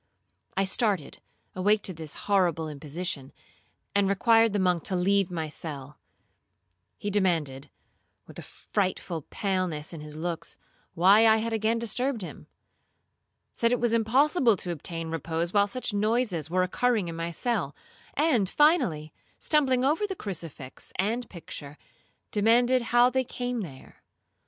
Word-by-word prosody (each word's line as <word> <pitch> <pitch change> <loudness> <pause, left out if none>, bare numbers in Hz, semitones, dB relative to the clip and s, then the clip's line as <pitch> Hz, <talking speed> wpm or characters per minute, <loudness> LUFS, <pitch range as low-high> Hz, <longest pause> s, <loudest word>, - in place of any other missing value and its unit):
I 195 - +3
started, 190 - 0 0.3
awake 205 +3 +2
to 185 - -1
this 155 -3 -7
horrible 175 -6 +2
imposition, 150 -1 -5 0.6
and 200 -1 +2
required 225 +3 +4
the 205 - 0
monk 180 -3 +1
to 190 - 0
leave 195 +1 +2
my 165 -3 -3
cell. 150 -2 -7 1.0
He 205 - -4
demanded, 165 -9 0 0.6
with - - -11
a - - -6
frightful 185 -4 -3
paleness 185 -6 -2
in 160 - -7
his 150 0 -9
looks, 170 0 -4 0.4
why 200 +6 +6
I 220 0 +6
had 225 +1 -2
again 220 +1 +1
disturbed 235 +1 0
him? - - -9 1.1
said 230 0 +1
it 245 - +2
was 235 -1 +1
impossible 245 - +3
to 175 - -4
obtain 165 +1 -5
repose 165 +2 -2
while 205 -1 +4
such 250 0 -2
noises 210 - 0
were 185 +2 +2
occurring 220 +1 +1
in 165 - -5
my 165 0 -3
cell; 170 - -2 0.4
and, 265 - +2
finally, 250 - +2 0.2
stumbling 265 -4 +2
over 320 +9 +1
the 385 - -4
crucifix 165 - -7
and 225 +6 -1
picture, 150 -4 -9 0.5
demanded 240 +4 +3
how 240 +1 +5
they 260 0 +1
came 245 -1 -3
there. 140 -9 -11
195 Hz, 140 wpm, -27 LUFS, 165-230 Hz, 1.1 s, why